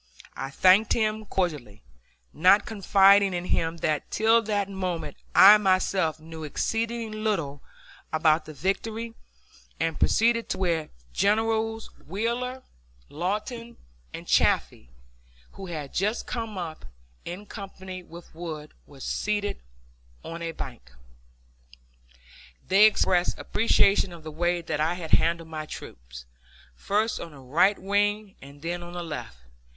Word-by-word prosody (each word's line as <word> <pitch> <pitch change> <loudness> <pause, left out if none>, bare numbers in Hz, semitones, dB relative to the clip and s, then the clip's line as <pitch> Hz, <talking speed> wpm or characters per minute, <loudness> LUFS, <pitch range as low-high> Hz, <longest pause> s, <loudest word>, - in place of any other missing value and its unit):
I 135 - -4
thanked 190 +8 +5
him 215 -1 0
cordially, 150 - -3 0.5
not 185 +6 +5
confiding 200 -2 +4
in 175 0 -3
him 165 -1 0
that 155 -2 -1
till 225 +2 +4
that 205 -3 -1
moment 185 -4 -4 0.2
I 210 +2 +10
myself 185 -4 +1
knew 160 0 -9
exceeding 225 +8 -2
little 160 -10 -1 0.5
about 155 0 +3
the 155 - -9
victory; 225 +7 -2 0.7
and 165 -1 -1
proceeded 230 +1 +2
to - - -1
where 170 -4 0 0.2
Generals 225 +2 0 0.2
Wheeler, 240 +7 -2 0.5
Lawton, 215 - -4 0.3
and - - -8
Chaffee, - - +2 0.6
who 195 - -9
had 150 -5 -6
just 210 +5 0
come 225 -4 -4
up, 165 -3 -6 0.4
in 180 +4 -7
company 190 -3 -8
with 170 -1 -13
Wood, 160 -2 -7
were 140 -2 -15
seated 205 +4 -2 0.6
on 165 +1 -7
a 165 0 -3
bank. - - -9 1.7
They 195 +3 +7
expressed 180 -4 +1
appreciation 200 -3 +2
of 170 -2 -11
the 155 - -7
way 175 +2 0
that 155 -2 -3
I 160 +3 +1
had 170 -3 -7
handled 165 0 +2
my 155 -1 -5
troops, 60 - -10 0.5
first 210 - 0
on 165 - -8
the 140 - -13
right 160 +10 +3
wing 205 +1 0
and 140 +2 -13
then 175 +1 -3
on 175 0 -9
the 175 0 -4
left! 150 - -7
185 Hz, 130 wpm, -26 LUFS, 160-210 Hz, 1.7 s, I